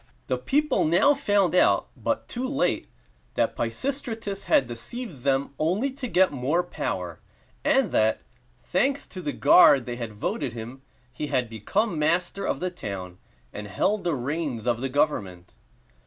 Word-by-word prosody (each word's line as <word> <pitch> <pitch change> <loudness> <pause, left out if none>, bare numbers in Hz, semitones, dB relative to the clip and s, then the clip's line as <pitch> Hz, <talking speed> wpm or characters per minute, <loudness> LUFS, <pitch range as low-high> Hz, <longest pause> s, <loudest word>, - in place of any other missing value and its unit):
The 125 - -1
people 295 - +1
now 180 - +4
found 205 - +2
out, 180 - +3
but - - -2
too 250 +2 -3
late, 275 0 0 0.5
that - - +1
Pisistratus 230 -7 -3
had 135 - +4
deceived 140 - -7
them 135 +1 0
only 190 - +1
to 265 -1 -6
get 190 -4 +3
more 145 +6 0
power; 175 - -4 0.4
and 270 -8 +3
that, 110 0 +2 0.4
thanks 275 +1 0
to 185 - -9
the 150 -4 -2
guard 140 -3 +6
they 120 -1 -5
had 115 -3 -5
voted 120 +4 -3
him, 120 +3 -8 0.3
he 150 +4 -4
had 130 -4 0
become 165 - -1
master 175 +5 0
of - - -1
the 185 0 -2
town, 95 - -7 0.3
and 105 0 -6
held 195 - 0
the 170 -3 0
reins 135 -3 -3
of 120 -1 0
the 135 - -1
government. 100 - -1
155 Hz, 155 wpm, -26 LUFS, 125-205 Hz, 0.5 s, guard